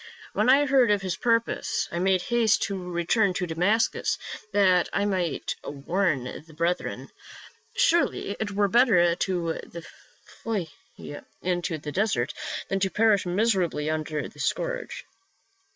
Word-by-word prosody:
When - - +2
I 280 +2 +6
heard 260 -4 +4
of 205 -2 +2
his 185 -3 -2
purpose, 230 +1 0
I 170 - -2
made 185 0 +2
haste 235 -1 +2
to 190 -3 -4
return 180 +3 +1
to 185 - -1
Damascus, 180 +7 +1 0.3
that 185 -3 +3
I 200 - 0
might 185 -6 -1
warn 155 0 -1
the 150 +5 -9
brethren. 170 +3 -2 0.6
Surely 475 - +2
it 220 - -2
were 205 0 +1
better 200 -7 +4
to 175 -2 -2 0.8
flee 200 -9 -2 0.7
into 175 -2 -1
the 150 0 -6
desert 150 - 0 0.3
than 195 - -1
to 190 0 +1
perish 210 -2 +2
miserably 180 -6 +1
under 155 -1 -3
the - - -17
scourge." - - -3
190 Hz, 135 wpm, -26 LUFS, 170-220 Hz, 0.8 s, I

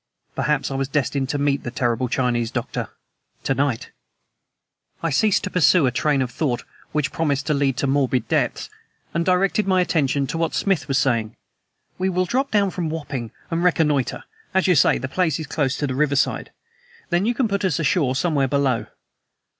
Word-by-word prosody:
Perhaps 150 -2 0
I - - -2
was 135 0 -1
destined 135 -1 -1
to 145 - -1
meet 140 -1 +1
the - - -5
terrible 120 0 0
Chinese 120 -3 0
doctor - - -4 0.5
to - - +1
night. 135 -3 -1 1.1
I 165 - 0
ceased 210 +7 +2
to - - -3
pursue 175 -2 +4
a 125 - +2
train 140 +2 +1
of 125 - -5
thought 125 -3 -1 0.3
which 150 -2 0
promised 150 -5 -1
to 150 - +1
lead 140 -3 +1
to - - 0
morbid 135 -2 +1
depths, - - 0 0.5
and 170 - +1
directed 195 +3 +2
my 185 -1 +3
attention 145 -6 +1
to 155 +5 -4
what 165 -1 0
Smith 195 -6 0
was 135 -2 +1
saying. 115 -6 0 0.6
"We 190 +1 +1
will 185 0 +1
drop 265 +8 0
down 200 -2 +2
from 175 -3 -3
Wapping 140 -7 -4 0.2
and 165 +1 0
reconnoiter, 150 -7 +1 0.3
as 190 - +3
you 185 - +5
say 140 - +4
the 130 - -4
place 160 +1 0
is 160 - -4
close 140 -2 -1
to 145 - -1
the 130 - -2
riverside. 140 0 0 0.6
Then 175 +5 +2
you 240 - +1
can 250 -1 +1
put 200 -1 -2
us 185 -7 +1
ashore 145 -4 +1
somewhere 140 -2 +1
below. 130 -5 0
145 Hz, 190 wpm, -22 LUFS, 135-175 Hz, 1.1 s, you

